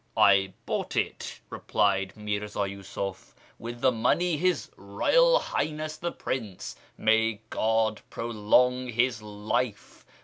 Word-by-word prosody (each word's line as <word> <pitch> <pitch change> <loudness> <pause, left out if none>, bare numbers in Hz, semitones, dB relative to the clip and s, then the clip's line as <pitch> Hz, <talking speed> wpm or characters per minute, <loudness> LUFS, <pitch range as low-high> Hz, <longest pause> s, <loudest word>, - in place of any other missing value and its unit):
" - - -24
I 95 -1 +5
bought - - -2
it," - - -2
replied 95 -1 +1
Mirzii 105 -1 -3
Yiisuf, 95 0 -6
" - - -30
with 120 +1 -7
the 130 - +5
money 165 +9 +1
His 180 +3 0
Eoyal - - +3
Highness 155 0 -3
the 170 +1 -3
Prince 110 -8 -5 0.2
(may 110 -1 +2
God 110 -1 +1
prolong 120 +3 +2
his 120 -1 +1
life 105 +2 -3
110 Hz, 125 wpm, -27 LUFS, 105-125 Hz, 0.2 s, I